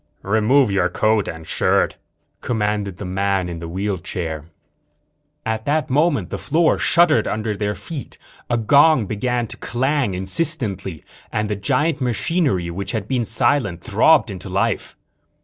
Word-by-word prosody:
"Remove 110 +4 +3
your 95 -2 +2
coat 110 +3 +1
and 80 -1 -7
shirt," - - +1 0.5
commanded 105 -4 -1
the 100 - -6
man 95 0 0
in 85 -1 -6
the 85 - -6
wheelchair. 85 -4 -3 1.0
At 110 0 -2
that 150 -1 0
moment 145 - +2
the - - -3
floor 165 +1 +2
shuddered 170 -3 +4
under 110 0 -2
their 105 +1 -2
feet, 160 -6 -8 0.3
a 120 - +2
gong 140 +2 +5
began 120 +4 -1
to - - -10
clang 130 -3 0
insistently, 95 - -2 0.3
and 105 0 -1
the - - 0
giant 145 - 0
machinery, 125 - 0
which 95 +3 -4
had 110 -3 -3
been 125 -2 0
silent, 115 -6 +1
throbbed - - +4
into - - -8
life. - - -1
110 Hz, 145 wpm, -21 LUFS, 95-135 Hz, 1.0 s, gong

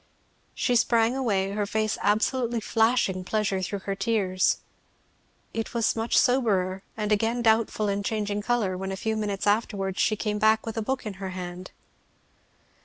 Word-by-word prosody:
She 245 - +1
sprang 235 0 +3
away, 200 -7 0
her 205 0 -1
face 215 0 -1
absolutely 235 +3 +1
flashing 220 -4 +1
pleasure 200 -1 0
through 195 +1 -3
her 195 - -1
tears. 195 -3 +1 1.0
It 225 +1 -4
was 230 -1 +2
much 225 +1 0
soberer, 195 -7 +2 0.2
and 210 -1 -2
again 225 +3 +1
doubtful 220 -1 +2
and 200 0 -1
changing 210 -1 -1
colour, 220 -5 0
when 190 +1 -4
a 190 - -4
few 220 +3 -1
minutes 205 -3 -2
afterwards 205 -2 0
she 215 - +3
came 210 -1 -2
back 220 +1 +3
with 225 - -5
a 225 - -1
book 260 +3 -2
in 200 -2 -6
her 190 - -3
hand. 180 0 -7
215 Hz, 165 wpm, -26 LUFS, 195-225 Hz, 1.0 s, sprang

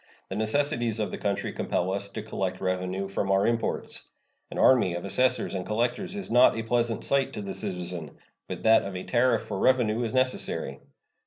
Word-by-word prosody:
The - - -4
necessities 120 0 +1
of 105 - -1
the - - -5
country 100 -1 -2
compel 95 +2 -1
us 100 0 -3
to 105 - -5
collect 95 -3 -3
revenue 95 +1 -2
from 95 0 -2
our 95 +1 +3
imports. 115 0 -2 0.4
An - - -7
army 115 -9 +4
of 85 - -5
assessors 125 +6 +1
and 95 -2 -2
collectors 120 - -1
is 200 - -6
not 120 0 +6
a 115 - -2
pleasant 115 0 0
sight 140 -1 +1
to 105 - -5
the 100 - -5
citizen, 90 -4 -5 0.3
but - - -6
that 110 0 +6
of 100 -1 -6
a 90 - -4
tariff 125 +1 +2
for - - -4
revenue 120 -3 +3
is 115 - -2
necessary. 130 - -1
110 Hz, 190 wpm, -27 LUFS, 95-120 Hz, 0.4 s, not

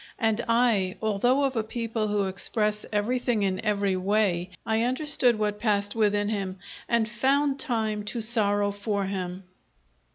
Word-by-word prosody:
And 225 0 0
I, 230 -6 +2
although 235 +6 +1
of 270 -2 0
a 225 - 0
people 225 -1 -3
who 205 -1 0
express 210 +2 0
everything 225 +1 0
in 190 0 -1
every 200 -3 +1
way, 185 -2 +1 0.2
I 220 0 +1
understood 255 -1 +2
what 210 -1 -1
passed 205 -2 +1
within 205 -2 +1
him 195 -3 -3 0.3
and 235 -2 +2
found 270 +4 +1
time 220 -6 -1
to 220 +3 -2
sorrow 205 -3 +2
for 205 0 -2
him. 185 -1 -4
215 Hz, 150 wpm, -26 LUFS, 200-235 Hz, 0.3 s, I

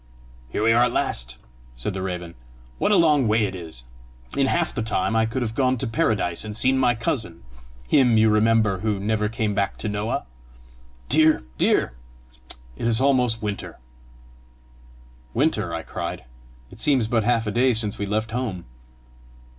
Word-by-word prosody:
"Here 105 - -2
we 115 +1 +4
are 120 +1 +5
at 125 - -1
last!" - - -1 0.4
said - - -4
the 95 - -4
raven. 90 -2 -5 0.5
"What - - +2
a - - +5
long 150 - +4
way 110 +1 +3
it 95 - -4
is! 80 -8 -9 0.5
In 135 -1 +2
half 170 +4 0
the 120 - -2
time 110 0 -1
I 110 0 +3
could 120 +3 -2
have 110 -2 -3
gone 130 +1 +1
to 130 - -1
Paradise 105 -6 0
and 105 0 -5
seen 130 +2 +2
my 125 -2 +3
cousin 110 - -3 0.4
him, 125 - +4
you 110 0 +5
remember, 110 -2 +3
who 105 -1 -1
never 105 +1 0
came 110 -2 -1
back 100 0 -1
to - - -4
Noah! 105 - -2 0.8
Dear! 155 - +3 0.2
dear! - - +2 0.8
it 115 - -3
is 115 0 +3
almost 125 -5 +2
winter!" 105 -1 -5 1.6
"Winter!" 135 - +1
I 85 -1 -4
cried; - - -5 0.5
"it - - -13
seems 135 -6 +3
but 115 0 +1
half 115 0 +1
a 105 - -2
day 125 +4 +3
since 110 -3 0
we 100 - -2
left 110 +2 -1
home!" 110 -8 -3
110 Hz, 170 wpm, -23 LUFS, 100-125 Hz, 1.6 s, are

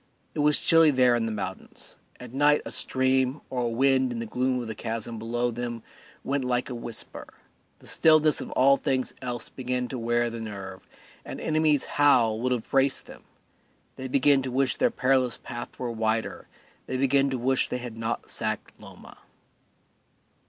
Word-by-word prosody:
It - - -6
was 150 0 +4
chilly 165 -1 +6
there 130 -3 +4
in 115 -1 -1
the - - -3
mountains; 95 -3 -7 0.2
at 125 -1 -10
night 145 +2 +3
a - - -6
stream 130 +1 +1
or 125 -1 -1
a - - 0
wind 130 +2 +2
in 120 - -4
the 115 - -4
gloom 125 +3 -1
of 120 - -5
the 110 - -5
chasm 115 0 -5
below 120 +2 -1
them 120 -1 -5 0.4
went 140 0 -1
like 125 +1 -1
a - - -3
whisper; 120 -1 -5 0.5
the - - -20
stillness 155 -2 +4
of - - -7
all 140 +2 +5
things 130 -1 -1
else 120 -2 -4
began 125 -1 -3
to 130 - -5
wear 120 0 0
the 115 0 -6
nerve 95 -3 -8 0.4
an - - -8
enemy's 155 -2 +2
howl 120 -7 +3
would 130 +1 0
have 120 -3 -2
braced 135 0 +2
them; - - -13 0.7
they 130 - -6
began 135 +1 +4
to 130 - -4
wish 130 +1 +1
their - - +2
perilous 125 -1 +1
path 120 -1 -8
were 125 -2 -3
wider, 110 0 -2 0.4
they 130 - -2
began 135 +1 +3
to 130 - -2
wish 130 +2 0
that - - -3
they 125 - -4
had 120 -3 -7
not 115 +1 -3
sacked - - -4
Loma. - - -14
125 Hz, 185 wpm, -26 LUFS, 115-135 Hz, 0.7 s, chilly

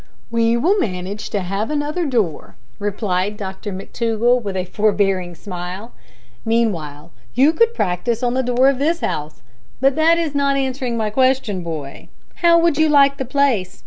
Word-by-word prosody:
"We 230 0 +2
will 370 - +2
manage 190 - -3
to 205 - -2
have 195 +4 -3
another 300 +3 -1
door," 220 - -2 0.2
replied 205 -1 -1
Dr 195 +1 -6
McTougall, 230 +5 0
with 200 -3 -4
a 185 - -1
forbearing 195 -3 0
smile; 185 +4 -7 0.5
"meanwhile 170 -10 -1 0.2
you 275 +6 +4
could 465 +6 +2
practise 215 - -1
on 245 0 +1
the 260 - +1
door 250 +1 +2
of 275 -2 +2
this 330 +4 0
house. 150 -2 -4 0.4
But 270 +1 +3
that 325 +2 +4
is 325 -4 -1
not 280 -1 +1
answering 260 -3 -2
my 215 -2 -1
question, 255 -6 +1
boy. 155 -5 -7 0.3
How 340 -1 +5
would 335 -3 +2
you 315 0 +4
like 280 -1 +5
the 265 - -3
place? 245 -9 0
230 Hz, 165 wpm, -19 LUFS, 190-275 Hz, 0.5 s, How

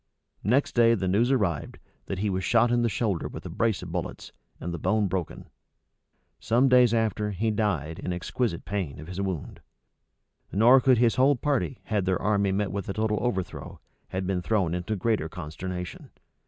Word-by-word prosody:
Next 125 +8 +2
day 115 -1 +5
the 95 -3 -2
news 110 +7 +2
arrived, 100 - 0 0.3
that 95 - -3
he 100 +1 0
was 95 0 -2
shot 115 +4 +3
in 120 0 +3
the 120 - +2
shoulder 105 -4 -1
with - - -9
a - - -6
brace 110 -5 0
of 90 - -7
bullets, 85 0 -5 0.3
and 85 - -4
the 85 - -4
bone 105 +6 +1
broken. 90 -2 -4 0.9
Some 120 +4 +3
days 125 -2 +6
after, 110 -2 0
he 110 +3 -1
died, 90 -7 -1
in 90 - -3
exquisite 90 +1 -2
pain, 90 -7 -3
of 75 - -8
his 90 +3 -5
wound; 95 -6 -4 0.9
nor 120 +6 +6
could 130 -1 +4
his 120 +1 +3
whole 135 +3 +5
party, 135 -1 -1
had 105 -4 -1
their 95 -1 +1
army 100 -1 +1
met 100 +1 -1
with 100 -2 -4
a - - -1
total 110 0 0
overthrow, 95 -7 -3 0.3
have 95 0 -3
been 90 -1 -1
thrown 95 -3 0
into 90 +5 -2
greater 105 -5 0
consternation. 90 +2 -6
100 Hz, 185 wpm, -27 LUFS, 90-115 Hz, 0.9 s, days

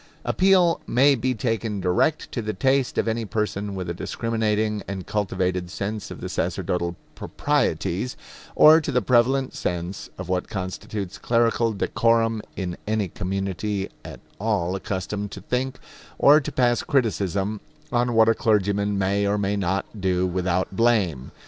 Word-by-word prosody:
Appeal 185 -3 +3
may 135 +4 +5
be 130 0 0
taken 115 -2 -2
direct 95 - +1
to 120 - -2
the 110 -1 -3
taste 135 -1 +1
of - - +1
any 115 +1 0
person 105 -2 -2
with 90 -2 -4
a 85 - -2
discriminating 110 +1 -1
and 95 -2 -5
cultivated 95 -3 -1
sense 105 +3 -4
of - - -9
the - - -4
sacerdotal 85 -1 -2 0.2
proprieties, 100 +9 -1 0.4
or 160 +2 +8
to - - -3
the 125 - +1
prevalent 125 +4 +2
sense 90 +2 -4
of 90 - -6
what 90 0 -1
constitutes 95 0 -5
clerical 115 -1 +2
decorum 115 +1 +1
in 90 -3 -4
any 105 -3 0
community 95 +2 -3
at - - -9 0.2
all 100 -4 0
accustomed 100 +2 -3
to 95 - -8
think 130 +5 -2 0.4
or 150 +2 +6
to - - -5
pass 120 -1 +2
criticism 105 -5 0 0.3
on 120 -1 +1
what 110 0 +6
a 115 - +5
clergyman 100 -2 +1
may 100 +1 +1
or 100 +1 +1
may 100 0 0
not 95 -1 -1 0.2
do 90 -1 +1
without 90 +1 -1
blame. 100 - +1
105 Hz, 150 wpm, -24 LUFS, 95-115 Hz, 0.4 s, or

